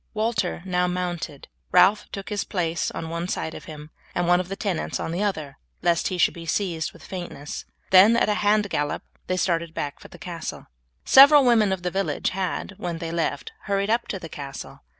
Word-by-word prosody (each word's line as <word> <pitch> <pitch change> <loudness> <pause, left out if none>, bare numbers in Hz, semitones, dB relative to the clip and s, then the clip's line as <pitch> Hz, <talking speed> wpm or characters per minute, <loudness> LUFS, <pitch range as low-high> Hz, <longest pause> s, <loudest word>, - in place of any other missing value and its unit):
Walter 215 -5 -1
now 180 -1 +1
mounted; 175 -5 -4 0.2
Ralph 210 +1 +5
took 195 -1 -6
his 205 -1 -1
place 170 -3 -1
on 165 - -5
one 170 +1 -3
side 160 -3 -3
of - - -9
him, 150 0 -10 0.2
and 175 - +1
one 175 0 +5
of 180 0 -4
his 195 - -4
tenants 195 -6 -2
on - - -3
the 175 +4 -2
other, 155 -9 -2 0.2
lest 170 -2 +2
he 185 - -2
should 175 - +3
be 165 -1 -9
seized 165 -2 -1
with - - -16
faintness; 175 -6 -6 0.3
then 200 +5 +8
at - - +3
a 210 - +2
hand 210 0 +3
gallop 145 0 -1 0.2
they 185 - 0
started 170 -2 0
back 145 -1 -4
for - - -12
the - - -14
castle. 170 -2 -6 0.4
Several 280 +1 +8
women 225 -5 +4
of 190 -2 -2
the 180 - -1
village 195 +1 -1
had, 190 0 -3
when 175 -2 -3
they 165 0 -5
left, 165 -4 -2
hurried 200 +1 0
up 235 +1 +1
to 195 - -3
the 175 - -8
castle. 140 -3 -8
180 Hz, 210 wpm, -24 LUFS, 165-200 Hz, 0.4 s, then